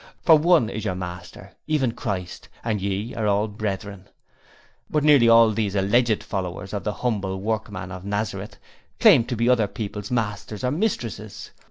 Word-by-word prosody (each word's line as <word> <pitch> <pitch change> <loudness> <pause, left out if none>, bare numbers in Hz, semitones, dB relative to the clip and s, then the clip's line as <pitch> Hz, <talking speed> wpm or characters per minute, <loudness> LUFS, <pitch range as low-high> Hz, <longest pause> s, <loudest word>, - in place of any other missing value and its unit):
For 160 - +7
one 155 -5 +4
is 110 -2 -5
your 95 -4 -2
master, 90 -1 -8 0.2
even 145 -6 +1
Christ, 100 -8 -5
and 110 -4 -1
ye 100 +4 -3
are 110 -2 -1
all 105 +1 +2
brethren.' 100 -2 -5 0.8
But 150 -1 0
nearly 145 -6 +6
all 115 -1 +7
these 105 -2 -2
alleged 110 +3 +2
followers 95 0 -5
of 100 - -3
the 105 - -1
humble 95 -5 -1
Workman 105 -3 -3
of 90 0 -8
Nazareth 105 +1 -4 0.4
claimed 115 - +6
to 125 - -1
be 115 +1 0
other 120 -4 +3
people's 105 -2 -6
masters 105 -2 -3
or 125 - +1
mistresses. 120 - -3
105 Hz, 165 wpm, -23 LUFS, 100-120 Hz, 0.8 s, For